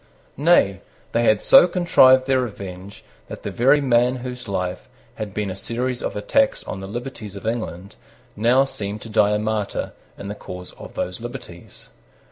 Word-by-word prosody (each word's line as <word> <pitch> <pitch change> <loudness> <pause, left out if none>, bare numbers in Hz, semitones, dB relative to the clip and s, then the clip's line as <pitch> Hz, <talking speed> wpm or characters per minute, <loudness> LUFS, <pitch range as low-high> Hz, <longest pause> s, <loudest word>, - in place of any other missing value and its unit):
Nay, 130 - +3 0.3
they 120 0 +1
had 110 -2 +3
so 270 -9 +8
contrived 130 -8 +5
their 130 -1 +2
revenge 100 -4 -8 0.2
that - - -9
the - - -4
very 135 +5 +4
man 125 -1 +3
whose 125 -1 -7
life 90 -2 -3 0.2
had 105 -2 -6
been 100 -1 -3
a - - -6
series 120 +5 -3
of - - -3
attacks 105 +1 +1
on 90 - -6
the 95 - -7
liberties 115 -2 -7
of 100 - -9
England 105 -5 -4 0.4
now 120 +5 +4
seemed 105 -5 -5
to 115 - -9
die 105 -1 +3
a - - +2
martyr 105 -1 -2 0.2
in 100 - -8
the 100 - -4
cause 90 -3 -9
of - - -12
those 90 +4 -4
liberties. 120 -8 -10
110 Hz, 175 wpm, -22 LUFS, 100-125 Hz, 0.4 s, so